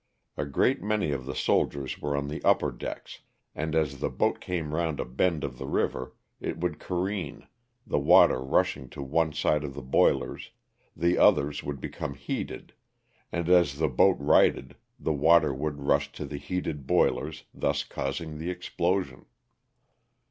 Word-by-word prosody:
A - - -2
great 70 - +1
many 105 -5 0
of 65 -2 -4
the 70 - -4
soldiers 70 -2 0
were 70 -1 -1
on 70 0 -2
the 75 - -6
upper - - +3
decks, - - -7 0.3
and 80 +1 -3
as 75 -4 0
the - - -1
boat - - 0
came 85 -4 -3
round 80 -2 -1
a - - -1
bend 75 +5 0
of 65 -3 -5
the 65 - -5
river 65 -1 -1 0.2
it - - -4
would 85 -2 -2
careen, 95 +2 -3 0.4
the - - 0
water 65 - +6
rushing 65 0 0
to 70 - -7
one 80 +3 +1
side 75 0 +1
of 70 -2 -6
the 70 - -7
boilers, 65 - +1 0.5
the 85 +1 +1
others 70 +1 +4
would 70 -1 -5
become 70 +2 -5
heated, 70 0 -5 0.6
and 85 -1 -2
as 85 -6 +4
the 80 0 +1
boat 65 - +4
righted 70 +1 +3 0.2
the 80 - 0
water 80 +1 +4
would 70 +1 -4
rush 70 0 +2
to 75 - -6
the 70 +1 -6
heated 80 -4 -4
boilers, 80 +1 +1
thus - - 0
causing 75 +3 -4
the 85 +3 -3
explosion. 90 +1 -2
75 Hz, 165 wpm, -28 LUFS, 70-85 Hz, 0.6 s, water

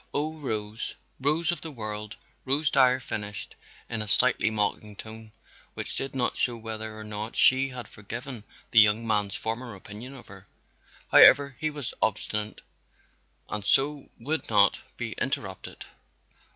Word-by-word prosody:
Oh, 155 +2 -1
Rose 110 -5 -4
" - - -41
"Rose 155 +5 +1
of 175 - -5
the 165 - -6
World," 110 -5 -6 0.3
Rose 145 +3 +1
Dyer 130 -2 +4
finished 105 -4 -6 0.3
in 110 -2 -4
a 110 - -6
slightly 120 +2 +3
mocking 105 0 -1
tone, 110 +1 -11 0.4
which - - -4
did 135 0 -3
not 125 -2 0
show 120 -2 +1
whether 110 -1 -7
or 110 - -8
not 105 +1 -5
she 130 +1 +4
had 125 -4 -8
forgiven 120 +3 -8 0.3
the 110 - +7
young 105 +2 +4
man's 105 -3 +4
former 115 0 0
opinion 105 +7 -10
of 125 - -13
her. 95 -1 -14 0.6
However, 140 0 +7
he 155 - -1
was 145 -5 -6
obstinate 105 0 -1 0.9
and 105 -1 -2
so 140 +7 +2
would 150 +7 -2
not 100 -2 +5 0.2
be - - -4
interrupted. - - -4
115 Hz, 150 wpm, -27 LUFS, 105-135 Hz, 0.9 s, the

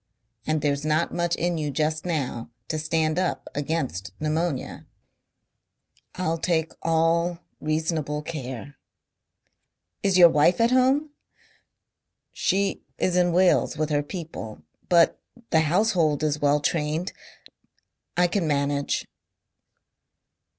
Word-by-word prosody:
And 155 -1 +1
there's 145 0 0
not 155 +2 +1
much 175 -1 0
in 175 -1 -1
you 150 -1 -2
just 155 +3 -1
now 135 -8 -2 0.2
to 155 - -1
stand 160 +1 0
up 185 -1 -2
against 140 - -3
pneumonia...." 155 -1 -2 1.3
"I'll 165 -2 -1
take 165 -1 0
all 165 +1 +2 0.2
reasonable 155 -1 -1
care." 140 -3 -6 1.2
"Is 195 -2 +2
your 175 -2 +9
wife 160 +3 +3
at 230 +1 +3
home!" 265 +4 +3 1.2
"She 195 +1 0 0.2
is 180 - 0
in 175 -1 +3
Wales 180 -3 +3
with 155 0 -1
her 145 -1 +2
people. 145 - -7 0.3
But 170 -2 +4 0.3
the 160 - +5
household 165 -3 +2
is 150 -1 0
well 145 0 +3
trained. 155 +3 -1 1.0
I 180 - +5
can 175 -1 0
manage." 140 -1 0
160 Hz, 115 wpm, -25 LUFS, 150-175 Hz, 1.3 s, your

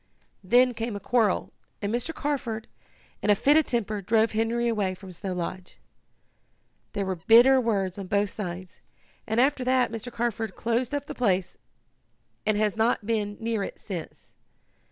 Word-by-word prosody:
Then 245 +6 +4
came 230 -1 -3
a - - -4
quarrel, 215 -1 +1 0.3
and 205 +1 -2
Mr. 245 +7 -1
Carford, 255 -8 -3 0.5
in - - -1
a 205 - +7
fit 275 +8 +4
of 315 -1 +4
temper, 215 -3 -1
drove 220 +3 +2
Henry 230 +2 0
away 205 -5 0
from 190 0 -11
Snow 185 +2 -4
Lodge. 180 +1 -5 1.2
There 200 -2 -1
were 190 -1 -2
bitter 240 +9 +6
words 200 -5 -1
on 195 - -6
both 200 +1 +1
sides, 180 -3 -6 0.5
and 220 +1 0
after 265 0 +3
that 255 -2 +2
Mr. 230 +2 -6
Carford 230 -2 -2
closed 235 +4 -1
up 285 -1 -3
the - - -6
place, 190 -7 0 0.9
and 215 -1 +3
has 210 -1 +1
not 225 -1 +1
been 210 -2 -1
near 225 -2 -1
it - - -5
since. 175 -6 -8
220 Hz, 165 wpm, -26 LUFS, 200-240 Hz, 1.2 s, a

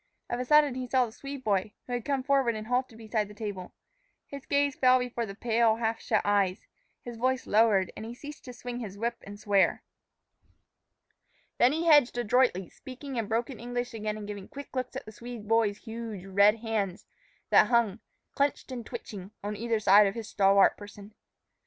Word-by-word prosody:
Of 240 - -1
a 250 - -2
sudden 300 0 +5
he 255 0 -4
saw 255 0 +3
the 225 - -9
Swede 275 +3 -8
boy, 205 -1 0
who 250 - -6
had 240 -2 -3
come 275 -2 -1
forward 270 -4 +2
and 215 0 -6
halted 250 0 -1
beside 220 -2 -2
the 210 - -13
table. 205 -4 -6 0.5
His 280 -1 -10
gaze 285 -1 +1
fell 255 0 +5
before 245 -2 -3
the 195 - -8
pale, 225 0 +2
half 225 0 -2
shut - - +1
eyes, 200 -2 +1 0.4
his 240 -1 -8
voice 255 +2 0
lowered, 210 -3 +3
and 215 - -7
he 230 +2 -7
ceased 295 +3 -10
to 250 - -8
swing 245 0 -6
his 205 -4 -7
whip 235 +2 -2
and 205 0 -9
swear. 200 -2 +2 1.8
Then 245 - +6
he 325 +3 -1
hedged 290 -7 +5
adroitly, 240 -5 +2
speaking 260 0 -9
in 225 -3 -1
broken 235 +3 -2
English 245 0 -4
again 215 -1 -3
and 210 - -7
giving 205 -2 -7
quick 280 -1 -10
looks 255 -1 -3
at - - -6
the 215 - -10
Swede 235 -1 -9
boy's 220 -2 +2
huge, 225 -4 -7
red 200 +2 +4
hands, 210 -5 -2 0.5
that - - +6
hung, 235 -4 +2 0.3
clenched 280 -1 -1
and 245 -2 -5
twitching, 210 - -8
on 210 +1 -3
either 225 +1 -1
side 205 0 +6
of 195 - -3
his 225 -2 -6
stalwart 195 -1 +4
person. 205 0 -12
230 Hz, 195 wpm, -28 LUFS, 210-250 Hz, 1.8 s, Then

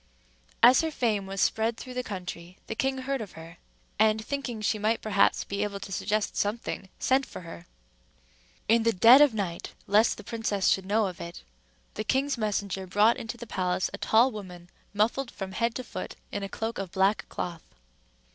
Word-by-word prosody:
As 255 +2 +8
her 325 - -1
fame 220 -9 -1
was 195 0 -3
spread 225 +1 +1
through 255 - -8
all - - -8
the - - +1
country, 180 -3 -7
the - - -4
king 265 +4 -1
heard 265 0 -2
of 210 - -8
her; 165 +1 -11 0.4
and, 220 0 +3
thinking 270 -4 -3
she 215 0 0
might 220 +2 +1
perhaps 200 -2 +2
be 200 0 -4
able 205 -1 -2
to 195 - -9
suggest 210 +2 -1
something, 205 -2 -2
sent 265 +1 +2
for - - -9
her. 170 0 -10 1.0
In 230 +1 +4
the 230 0 +2
dead 235 +9 +8
of 295 - +8
the - - -5
night, 175 -4 -4
lest 210 +3 +3
the - - -10
princess 215 -4 0
should 190 -1 +1
know 215 +2 +2
it, 170 -2 -7 0.5
the 215 - -3
king's 270 +5 +1
messenger 200 -4 -2
brought 210 +5 +4
into 225 +1 -6
the 235 - -8
palace 185 -4 -1
a - - -6
tall 235 +4 +4
woman, 180 -5 -9 0.2
muffled 230 +5 0
from 195 -4 -6
head 230 +4 -1
to 255 - -4
foot - - -7 0.2
in 205 - -3
a 195 - -4
cloak 225 +3 -4
of 195 -3 -5
black 195 +2 +1
cloth. 170 -2 -5
215 Hz, 195 wpm, -28 LUFS, 195-230 Hz, 1.0 s, As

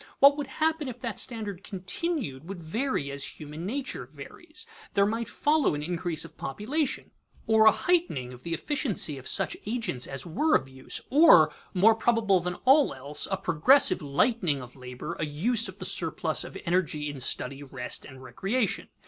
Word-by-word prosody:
What 280 +1 +7
would 290 -2 -4
happen 310 +2 0
if 250 -1 -7
that 230 -6 -4
standard 205 -6 -4
continued 190 - -4
would 195 -2 -6
vary 165 - -2
as 140 0 -5
human 155 +3 -7
nature 255 - -4
varies. 310 - -7 0.3
There 200 - +5
might 225 +1 -2
follow 295 - +2
increase 165 +1 -2
of 160 - -14
population, 255 - -2 0.3
or 220 -1 +5
a - - +10
heightening 320 - 0
of 125 - -13
the 170 +3 -3
efficiency 205 - 0
of 130 - -9
such 195 - +1
agents 210 - -2
as 135 -1 -6
were 300 - +2
of 135 - +1
use, 130 0 -4
or, 255 - +7 0.2
more 210 +5 +6
probable 220 -4 +2
than 180 +1 -3
all 270 - +5
else, 140 +3 -2
a 195 - 0
progressive 190 - +4
lightening 150 - +1
of 125 -1 -11
labor, 125 +5 -7
a 155 - 0
use 220 +11 +1
of - - -10
the - - -6
surplus - - 0
of - - -8
energy 170 -4 0
in 145 -2 -6
study, 135 +2 -2
rest, 130 -3 -3
and 130 0 -12
recreation. 195 - -1
185 Hz, 175 wpm, -27 LUFS, -, 0.3 s, a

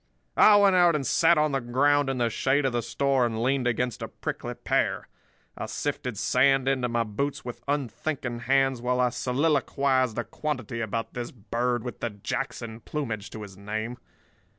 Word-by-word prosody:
"I 215 - +7
went 200 -2 +5
out 175 -3 +5
and 140 -3 -1
sat 165 +6 +4
on 150 0 +2
the 135 -1 0
ground 140 +4 +2
in 135 - -1
the 120 -2 +1
shade 135 +5 +1
of 130 - 0
the 120 - +1
store 135 +2 +1
and 115 -1 -1
leaned 130 0 +1
against 120 0 -1
a - - -3
prickly - - -5
pear. - - 0 0.5
I - - -5
sifted - - -3
sand 135 -1 +3
into 130 -2 +1
my 115 0 +1
boots 120 +7 -3
with 120 -1 -7
unthinking 135 -2 -2
hands 135 0 +2
while 125 +1 0
I 125 0 +3
soliloquised 130 -1 +1
a 120 - 0
quantity 130 -7 -4
about 115 +1 -3
this 120 -1 -4
bird 120 +1 -2
with 125 - -6
the 120 - -2
Jackson 115 +2 -5
plumage 110 -6 -4
to 110 - -8
his 95 -2 -10
name. 110 +4 -5
125 Hz, 180 wpm, -27 LUFS, 115-140 Hz, 0.5 s, I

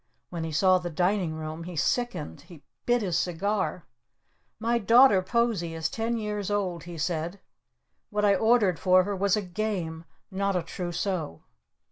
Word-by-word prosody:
When 170 -2 -4
he 160 - -4
saw 185 +4 +4
the 175 -1 -5
Dining 175 0 0
Room 155 +1 -6
he 180 -1 -7
sickened. 175 - -1
He 165 -5 -14 0.2
bit 240 -2 +3
his 175 -3 0
cigar. 185 0 -1 0.7
"My 235 +1 +1
daughter 230 -2 +6
Posie 195 -5 0
is 160 -1 -1
ten 230 +1 -2
years 210 -2 -3
old," 185 -5 -2
he 170 -1 -8
said. 165 +4 -2 0.7
"What 210 -1 0
I 200 - +5
ordered 210 -3 +3
for 185 0 +5
her 200 +1 -3
was 200 +1 +2
a 210 - -2
Game! 180 -4 -3 0.3
not 195 0 -1
a 180 - 0
Trousseau!" 175 - -4
185 Hz, 160 wpm, -27 LUFS, 170-210 Hz, 0.7 s, daughter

